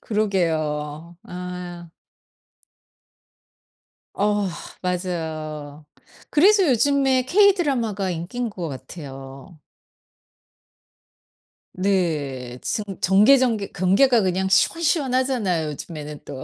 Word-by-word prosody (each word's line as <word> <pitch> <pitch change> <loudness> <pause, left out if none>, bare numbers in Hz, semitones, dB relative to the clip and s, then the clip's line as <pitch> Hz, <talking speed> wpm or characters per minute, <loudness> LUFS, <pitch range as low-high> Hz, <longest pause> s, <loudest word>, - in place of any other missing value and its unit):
그러게요. 165 -6 -2
아. 180 -1 -7 2.3
어 205 0 +1 0.4
맞아요. 155 -5 -4 0.4
그래서 385 +4 +5
요즘에 265 +1 +3
K 400 +6 +5
드라마가 230 - -1
인기인 200 +9 -4
것 175 -4 -5
같아요. 135 +2 -10 2.2
네. 150 -10 -1
증 215 - -2 0.2
전개 210 +9 +6
전개 230 -6 0
경계가 205 +7 +3
그냥 190 0 0
시원시원하잖아요. 255 - +1
요즘에는 150 0 -8
또. 135 -2 -7
185 Hz, 185 characters per minute, -22 LUFS, 155-240 Hz, 2.3 s, 전개